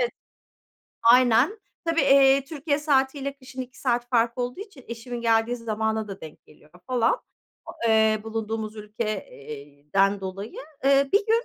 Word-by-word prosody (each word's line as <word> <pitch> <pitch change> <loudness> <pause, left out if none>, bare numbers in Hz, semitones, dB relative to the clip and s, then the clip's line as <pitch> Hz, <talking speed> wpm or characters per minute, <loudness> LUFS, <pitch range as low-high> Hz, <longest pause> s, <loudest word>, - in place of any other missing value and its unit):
Evet. - - +1 0.9
Aynen, 245 - +5 0.3
tabii, 330 0 +2
eee, 275 0 +5
Türkiye 290 0 -2
saatiyle 280 -1 0
kışın 260 -1 -9
2 255 +1 -13
saat 240 -2 0
fark 235 -1 +1
olduğu 250 +8 -3
için 395 - -11
eşimin 235 +1 -6
geldiği 230 +1 +2
zamana 220 -1 -2
da 195 - -8
denk 155 -1 -11
geliyor 150 0 -21 0.2
falan, 250 - +2 0.5
o, - - -6 0.2
eee, 220 -1 +4
bulunduğumuz 220 -1 -4
ülke, 215 0 -4
iii, 145 0 -11
den 195 0 +3
dolayı. 195 +3 -6 0.3
Eee, 275 0 +4
bir 405 +1 +3
gün, 460 +2 +2
235 Hz, 150 wpm, -25 LUFS, 215-275 Hz, 0.9 s, Aynen